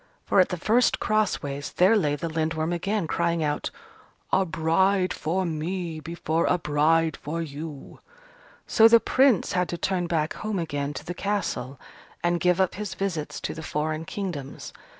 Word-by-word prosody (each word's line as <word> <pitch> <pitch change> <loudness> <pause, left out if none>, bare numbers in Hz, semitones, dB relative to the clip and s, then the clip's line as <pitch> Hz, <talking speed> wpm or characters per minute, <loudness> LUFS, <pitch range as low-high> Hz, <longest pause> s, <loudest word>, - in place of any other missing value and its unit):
For, - - +3
at 185 - +5
the 180 - -3
first 230 +8 +2
cross 215 -2 +1
ways, 140 0 -5
there 190 +5 +5
lay 150 -9 +2
the 155 +3 -4
Lindworm 160 +1 -1
again, 195 +2 -1
crying 170 0 0
out, 150 -1 -1 0.6
"A 190 -1 +3
bride 185 +4 +2
for 185 +4 -1
me 165 +1 -3
before 165 0 -1
a 180 - +3
bride 160 +1 +2
for 160 +3 -5
you!" 150 -1 -8 0.7
So 225 - +6
the 230 0 +7
Prince 260 -2 +3
had 180 -2 0
to 175 - -3
turn 180 +1 -1
back 160 -2 0
home 215 -2 -3
again 145 -4 -3
to - - -7
the 175 - -4
Castle, 180 -10 -3 0.4
and 175 0 +2
give 180 +1 +2
up 190 -2 +2
his 210 -1 -5
visits 175 -6 -3
to - - -3
the 160 - -7
foreign 155 +1 -2
kingdoms. 165 -9 -6
170 Hz, 170 wpm, -26 LUFS, 155-190 Hz, 0.7 s, the